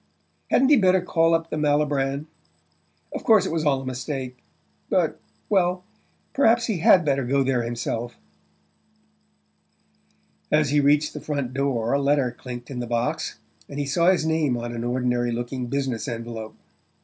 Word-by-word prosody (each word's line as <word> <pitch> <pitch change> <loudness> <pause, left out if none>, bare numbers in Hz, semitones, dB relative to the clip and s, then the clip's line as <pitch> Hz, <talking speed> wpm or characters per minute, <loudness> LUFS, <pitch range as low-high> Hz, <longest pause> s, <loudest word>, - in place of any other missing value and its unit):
Hadn't 265 +1 +4
he 295 - +6
better 190 -3 +4
call 165 -2 +2
up 165 0 -3
the - - -2
Malibran? 145 -1 0 0.9
Of - - -5
course 215 -4 +5
it - - -2
was 160 -1 -1
all 140 -3 +2
a - - -9
mistake 130 0 -4 0.5
but... - - +1 0.3
well, 180 -2 +1 0.5
perhaps 235 -3 +3
he 215 -7 -2
HAD 175 +1 +5
better 140 -2 +1
go 135 +3 +1
there 130 -2 +1
himself... 120 0 -4 2.3
As 150 -2 +3
he 145 - +3
reached 145 +1 +3
the - - -7
front 140 -4 -3
door 130 -4 0
a 140 - +2
letter 140 -3 +2
clinked 120 +1 -9
in 125 - -5
the 120 - -4
box, 120 +1 -2 0.3
and 140 - -7
he 145 - -1
saw 170 +6 +2
his 185 -4 +2
name 160 -6 +1
on 120 0 -5
an 115 0 -4
ordinary 120 0 0
looking 120 +2 -4
business 135 -1 -2
envelope. 115 -2 -6
140 Hz, 160 wpm, -24 LUFS, 120-160 Hz, 2.3 s, he